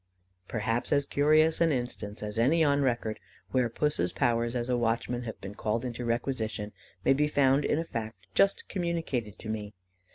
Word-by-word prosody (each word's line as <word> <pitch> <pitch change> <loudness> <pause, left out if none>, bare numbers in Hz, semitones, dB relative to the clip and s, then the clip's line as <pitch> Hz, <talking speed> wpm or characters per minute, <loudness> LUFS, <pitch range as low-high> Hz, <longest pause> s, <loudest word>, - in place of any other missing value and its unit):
Perhaps 115 +1 -1
as 140 -1 +3
curious 155 +4 +3
an 165 -1 +4
instance 120 -5 -3
as 105 +1 -3
any 155 +8 +4
on 145 -1 +3
record, 120 -4 0 0.3
where 125 -3 +2
Puss's 115 - 0
powers 120 -2 +1
as 120 -1 -1
a 125 - +1
watchman 120 +1 0
have 110 - -6
been 95 +1 -7
called 110 +3 -1
into 120 0 -4
requisition, 115 -3 -2 0.3
may - - +6
be 150 +2 +2
found 140 -1 +3
in - - +1
a 165 - -1
fact 110 - -6
just 195 0 +3
communicated 165 - -2
to - - -9
me. 105 -2 -4
120 Hz, 175 wpm, -29 LUFS, 110-145 Hz, 0.3 s, may